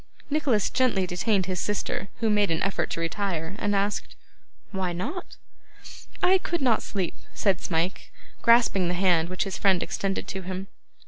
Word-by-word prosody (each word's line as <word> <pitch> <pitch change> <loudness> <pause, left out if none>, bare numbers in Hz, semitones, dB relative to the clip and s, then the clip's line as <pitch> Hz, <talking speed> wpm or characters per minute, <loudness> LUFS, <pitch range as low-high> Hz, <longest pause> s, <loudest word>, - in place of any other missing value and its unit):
Nicholas 270 -9 +2
gently 240 -8 +2
detained 185 +2 +1
his 185 -1 -2
sister, 200 +1 -2
who 225 - +2
made 210 -1 +3
an 165 - 0
effort 195 - 0
to - - -3
retire; 165 0 -2
and 205 0 +1
asked, 200 +1 -1 0.6
'Why 185 -3 -2
not?' 295 - -5 0.9
'I 375 +1 +6
could 345 -1 -2
not 240 -4 +3
sleep,' 190 -4 -2 0.2
said 195 -3 +1
Smike, 170 +2 -1 0.3
grasping 230 -6 +5
the 175 - 0
hand 175 -3 +3
which 185 0 -1
his 195 - -5
friend 190 -3 +3
extended 195 -1 -2
to 190 - -4
him. 185 +1 -5
195 Hz, 165 wpm, -26 LUFS, 180-210 Hz, 0.9 s, I